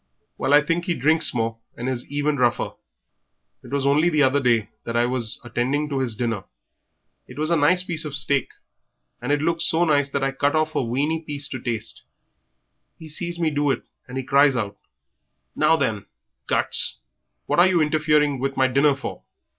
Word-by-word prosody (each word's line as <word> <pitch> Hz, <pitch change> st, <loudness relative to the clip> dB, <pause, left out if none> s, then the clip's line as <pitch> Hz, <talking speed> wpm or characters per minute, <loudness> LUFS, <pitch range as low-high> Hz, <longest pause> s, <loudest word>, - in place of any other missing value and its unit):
"Well, 135 Hz, -, -2 dB
I 145 Hz, +1 st, +6 dB
think 165 Hz, +3 st, -1 dB
he 175 Hz, -, -1 dB
drinks 155 Hz, +5 st, +3 dB
more, 115 Hz, -1 st, -2 dB, 0.2 s
and 120 Hz, -, -5 dB
is 125 Hz, -2 st, -3 dB
even 145 Hz, +1 st, -1 dB
rougher. 120 Hz, -2 st, 0 dB, 0.9 s
It -, -, -12 dB
was 140 Hz, -1 st, -2 dB
only 150 Hz, +5 st, +3 dB
the 155 Hz, -3 st, +2 dB
other 135 Hz, +1 st, +3 dB
day, 120 Hz, -4 st, +2 dB
just 105 Hz, -, -20 dB, 0.2 s
as 115 Hz, -, -3 dB
I 120 Hz, 0 st, +3 dB
was 120 Hz, -3 st, +2 dB
attending 130 Hz, +5 st, -2 dB
to 140 Hz, -2 st, -2 dB
his 125 Hz, -4 st, -2 dB
dinner 115 Hz, -4 st, -3 dB, 0.8 s
it -, -, -13 dB
was 155 Hz, +2 st, -1 dB
a -, -, +4 dB
nice 175 Hz, +4 st, +4 dB
piece 165 Hz, -4 st, -1 dB
of 150 Hz, -2 st, -5 dB
steak, 140 Hz, -2 st, +1 dB, 0.7 s
and -, -, -3 dB
it 145 Hz, 0 st, +1 dB
looked 165 Hz, 0 st, 0 dB
so 170 Hz, +1 st, +3 dB
nice 145 Hz, -3 st, +2 dB
that 140 Hz, 0 st, -2 dB
I 135 Hz, -, 0 dB
cut 140 Hz, +2 st, 0 dB
off 155 Hz, 0 st, 0 dB
a -, -, 0 dB
weany 140 Hz, +7 st, -1 dB
piece 145 Hz, -2 st, -1 dB
to 130 Hz, -, -5 dB
taste. 115 Hz, -2 st, -4 dB, 1.0 s
He 160 Hz, -, -11 dB
sees 175 Hz, +3 st, -4 dB
me 160 Hz, -2 st, +1 dB
do 145 Hz, 0 st, 0 dB
it, 135 Hz, -, -1 dB, 0.2 s
and 125 Hz, +1 st, -7 dB
he 130 Hz, -, -3 dB
cries 140 Hz, +1 st, +3 dB
out, 105 Hz, -4 st, -3 dB, 0.8 s
'Now 155 Hz, +2 st, +3 dB
then, 110 Hz, -9 st, -2 dB, 0.4 s
guts, -, -, +3 dB, 0.4 s
what -, -, 0 dB
are 175 Hz, -, +7 dB
you 185 Hz, -2 st, +2 dB
interfering 150 Hz, -2 st, +1 dB
with 135 Hz, +1 st, -3 dB
my 130 Hz, -, +3 dB
dinner 140 Hz, +2 st, +2 dB
for?' 135 Hz, -, -7 dB
145 Hz, 200 wpm, -22 LUFS, 125-155 Hz, 1.0 s, are